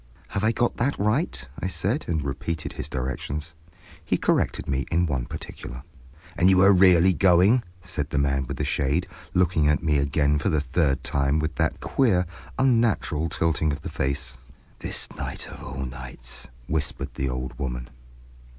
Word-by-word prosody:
"Have 100 - -2
I 110 - +4
got 120 +1 0
that 135 +4 +1
right?" 105 - 0
I - - -2
said, 105 - -1
and 80 -4 0
repeated 70 +4 -3
his - - -6
directions. 70 +4 -3 0.5
He - - +1
corrected - - +1
me 70 0 -1
in 85 +1 +2
one 65 -6 -1
particular. 65 +2 -8 0.5
"And 90 +2 +4
you 95 -1 +5
are 100 +1 +7
really 90 -1 +6
going?" 95 +7 +5 0.2
said 85 -6 -3
the - - -2
man 70 -1 +1
with - - -4
the - - -1
shade, 75 +5 +1 0.3
looking 85 -4 +3
at 75 - +2
me 75 -3 +3
again 70 +1 +2
for 75 - 0
the 80 -4 +2
third 70 0 +1
time 70 +1 +1
with 80 0 -1
that - - 0
queer, 95 -9 +2 0.3
unnatural 115 - +2
tilting 80 -2 +1
of 70 +1 -4
the - - -5
face. 65 -1 -2 0.4
"This - - -2
night - - -4
of - - -10
all 65 0 -4
nights!" 65 -1 -8 0.2
whispered 70 -3 -2
the 65 +1 -2
old 65 0 -4
woman. - - -3
75 Hz, 170 wpm, -25 LUFS, 70-90 Hz, 0.5 s, are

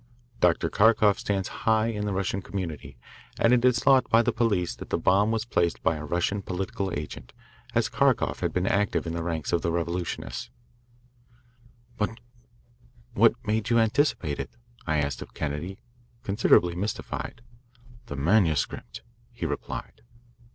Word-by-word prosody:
Dr. 90 -2 +3
Kharkoff 110 -1 +4
stands 95 -2 -1
high 110 -1 +1
in 105 -2 -3
the - - -1
Russian 100 0 -1
community, 90 -6 -6 0.4
and 115 - +4
it 125 -1 +3
is 125 -2 +4
thought 130 +1 +4
by 115 +1 +5
the - - +1
police 100 - +1
that - - -9
the - - +1
bomb 100 +3 +3
was 115 0 -1
placed 85 -7 0
by 80 - +2
a 75 - -6
Russian 90 +6 0
political 95 +1 -3
agent, 75 -4 -8 0.4
as - - +3
Kharkoff - - +1
has - - -1
been 90 0 0
active 100 -1 +1
in 85 - -3
the 85 - -2
ranks 80 -3 -3
of 85 - +2
the 85 - 0
revolutionists." 85 -7 -3 1.5
"But 115 +2 -2 0.9
what - - +5
made 110 +1 0
you 120 - +4
anticipate 110 - +1
it?" - - -4 0.4
I 80 -1 +1
asked 70 -1 -1
of - - -10
Kennedy, 80 +6 -4 0.4
considerably 100 -4 +3
mystified. 105 +4 -4 0.6
"The 70 - -5
manuscript," 80 - +1 0.3
he - - -5
replied. - - -5
95 Hz, 150 wpm, -27 LUFS, 85-110 Hz, 1.5 s, by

